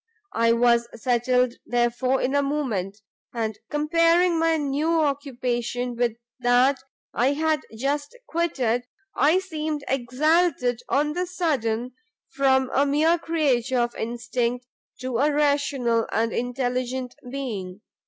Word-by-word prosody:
I 230 0 +3
was 235 0 +3
settled, 250 +1 +1
therefore, 245 +2 +1
in 265 - 0
a 285 - +3
moment, 225 -9 -2 0.3
and 220 -2 -2
comparing 335 +3 +3
my 325 0 +2
new 300 +3 0
occupation 250 -4 -2
with 235 -1 0 0.2
that 250 +3 +3 0.3
I 255 +5 +2
had 315 +1 +1 0.2
just 285 - -2
quitted, 250 -8 -1 0.3
I 310 +5 +4
seemed 310 -5 -3
exalted 265 0 +1
on 295 +2 +1
the 360 +2 -2
sudden 255 -10 -1 0.4
from 265 -1 +2
a 275 - +4
mere 310 +4 +2
creature 270 -7 0
of 240 0 +1
instinct, 240 +1 -2 0.4
to 255 -2 -2
a 295 +3 +3
rational 285 -5 +1
and 225 0 0
intelligent 250 0 -2 0.2
being. 210 -8 -5
260 Hz, 120 wpm, -24 LUFS, 240-300 Hz, 0.4 s, I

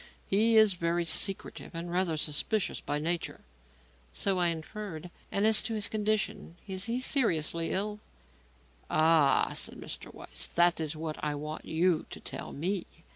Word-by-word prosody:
He 220 +3 +4
is 215 -2 +7
very 170 0 0
secretive 195 0 -2
and 170 +1 -4
rather 175 -3 +1
suspicious 170 +7 -1
by 145 - -2
nature." 165 +3 -2 0.7
"So 190 - 0
I 175 - +3
inferred. 170 +1 -5 0.2
And 200 - +2
as 220 -1 +6
to 225 +1 -2
his 210 -1 0
condition; 215 -5 -1
is 190 -1 -1
he 235 +2 -1
seriously 170 - +2
ill?" 210 +2 -1 0.9
"Ah," 155 -2 +4
said - - -3
Mr. - - -6
Weiss, - - -5
"that 175 0 +3
is 155 -1 -3
what 155 0 -5
I 150 -1 0
want 150 +2 -6
you 170 0 +1
to - - -8
tell - - -6
me. 180 +5 -2
175 Hz, 155 wpm, -30 LUFS, 160-210 Hz, 0.9 s, is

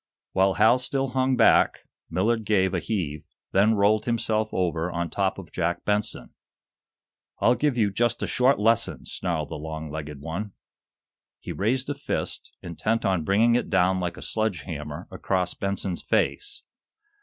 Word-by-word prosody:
While 95 0 +2
Hal 115 +4 +5
still 135 +1 -1
hung 130 0 +1
back, - - +4 0.3
Millard 110 +7 +1
gave 95 -3 +2
a - - +1
heave, 80 -9 -3 0.3
then 105 +3 +4
rolled 105 +1 +3
himself 110 -2 0
over 85 -1 -1
on 85 -1 -3
top 95 -1 0
of 90 -6 -10
Jack 85 0 -2
Benson. 105 -11 -1 1.1
"I'll 120 - +4
give 145 -1 0
you 105 -3 +2
just 120 +4 0
a - - +1
short 130 +2 +3
lesson!" 110 +2 +1
snarled - - -3
the - - -5
long 80 0 -6
legged 75 -2 -6
one. 85 +8 -5 0.9
He - - -7
raised 125 +6 0
a 145 - -1
fist, 145 - -5
intent 90 +7 -1
on 95 -4 +1
bringing 110 +7 +3
it 120 - 0
down 95 -1 +3
like 90 -1 -3
a - - -8
sledge 110 -7 -1
hammer 75 -3 -6
across 90 -2 -1
Benson's 100 -2 -3
face. 415 - -1
100 Hz, 160 wpm, -25 LUFS, 85-115 Hz, 1.1 s, Hal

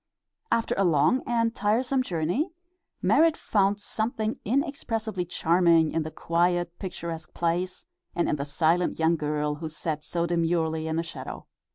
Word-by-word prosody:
After 230 - +2
a - - +4
long 165 - +3
and 230 -1 +1
tiresome 245 +5 +1
journey 180 - -1 0.5
Merrit 320 +2 +4
found 200 0 +1
something 220 +1 -2
inexpressibly 225 - -1
charming 170 -2 +3
in 165 - 0
the 155 - -4
quiet, 175 +1 0
picturesque 170 -4 -6
place, 175 - -1 0.3
and 175 - +1
in - - +1
the 140 - -3
silent 160 +5 +1
young 165 +1 +3
girl 150 -1 -1
who 160 +2 -5
sat 155 -1 -4
so 170 +1 -1
demurely 165 -2 0
in 160 - -1
the 165 - 0
shadow. 165 - -8
175 Hz, 150 wpm, -27 LUFS, 160-220 Hz, 0.5 s, a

